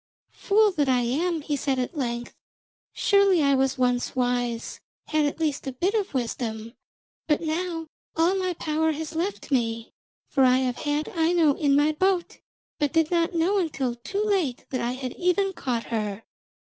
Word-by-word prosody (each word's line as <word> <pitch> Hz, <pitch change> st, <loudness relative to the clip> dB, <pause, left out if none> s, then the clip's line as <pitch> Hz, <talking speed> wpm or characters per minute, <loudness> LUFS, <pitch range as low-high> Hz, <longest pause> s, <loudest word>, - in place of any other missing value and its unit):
'Fool 425 Hz, +1 st, +3 dB
that 290 Hz, -6 st, 0 dB
I 250 Hz, -1 st, +3 dB
am,' 315 Hz, +8 st, 0 dB
he 295 Hz, 0 st, -2 dB
said 275 Hz, -1 st, -1 dB
at 255 Hz, +6 st, -2 dB
length, 240 Hz, -4 st, -3 dB, 0.6 s
'surely 400 Hz, -6 st, +3 dB
I 280 Hz, 0 st, +4 dB
was 265 Hz, 0 st, +1 dB
once 245 Hz, 0 st, 0 dB
wise, 245 Hz, -2 st, -1 dB, 0.3 s
had 310 Hz, -1 st, +2 dB
at 290 Hz, -, -4 dB
least 300 Hz, -3 st, -1 dB
a -, -, -1 dB
bit 355 Hz, +11 st, 0 dB
of 410 Hz, -9 st, -1 dB
wisdom, 230 Hz, -2 st, -3 dB, 0.5 s
but 300 Hz, -2 st, +3 dB
now 330 Hz, +1 st, -2 dB, 0.3 s
all 330 Hz, +3 st, +3 dB
my 370 Hz, -2 st, -1 dB
power 315 Hz, 0 st, 0 dB
has 310 Hz, +1 st, -5 dB
left 345 Hz, 0 st, -3 dB
me. 230 Hz, -3 st, -1 dB, 0.3 s
For 270 Hz, -, +2 dB
I 255 Hz, 0 st, +5 dB
have 255 Hz, -1 st, -1 dB
had 295 Hz, +1 st, -1 dB
Aino 330 Hz, -2 st, +3 dB
in 280 Hz, -1 st, +2 dB
my 295 Hz, +2 st, +4 dB
boat, 370 Hz, +2 st, 0 dB, 0.4 s
but 295 Hz, +1 st, 0 dB
did 325 Hz, -1 st, +2 dB
not 340 Hz, 0 st, +1 dB
know 365 Hz, +5 st, +2 dB
until 275 Hz, -8 st, -1 dB
too 385 Hz, -, -3 dB
late 375 Hz, -, 0 dB
that 255 Hz, -, -1 dB
I 240 Hz, +1 st, -1 dB
had 255 Hz, -1 st, -5 dB
even 380 Hz, +2 st, +1 dB
caught 245 Hz, -8 st, -2 dB
her.' 210 Hz, -1 st, -2 dB
295 Hz, 175 wpm, -25 LUFS, 250-345 Hz, 0.6 s, I